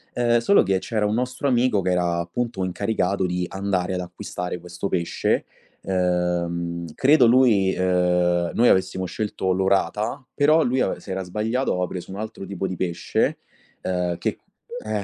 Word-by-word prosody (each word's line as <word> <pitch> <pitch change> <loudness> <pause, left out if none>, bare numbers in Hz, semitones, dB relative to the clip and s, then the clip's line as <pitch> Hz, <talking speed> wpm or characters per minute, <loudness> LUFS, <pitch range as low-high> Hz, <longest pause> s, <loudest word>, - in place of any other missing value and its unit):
Eh, 120 -1 +3
solo 200 +12 +5
che 95 0 +1
c'era 105 +1 -1
un 105 - 0
nostro 125 +3 -2
amico 125 -4 +2
che 90 0 0
era 90 -1 +1
appunto 95 +4 -3
incaricato 95 0 -1
di 90 0 -1
andare 95 -1 -1
ad 90 - -2
acquistare 90 0 -5
questo 90 +2 -5
pesce. 85 -2 0 0.4
Ehm, 85 -2 -1
credo 135 -1 +5
lui 115 -6 +4
ehm, 90 -1 +2
noi 120 +1 +4
avessimo 95 0 +2
scelto 95 -1 -2
l'orata, 100 +7 0
però 155 +3 +4
lui 130 +2 0
ave - - -1
s'era 95 -1 -4
sbagliato, 110 +8 -1
aveva 90 0 0
preso 90 0 -7
un 95 - -6
altro 110 -2 -6
tipo 95 -1 -3
di 95 - -4
pesce, 85 -2 -1 0.4
eh, 90 -1 -1
che - - -2 0.5
eh, 105 -2 -2
95 Hz, 160 wpm, -23 LUFS, 90-110 Hz, 0.5 s, solo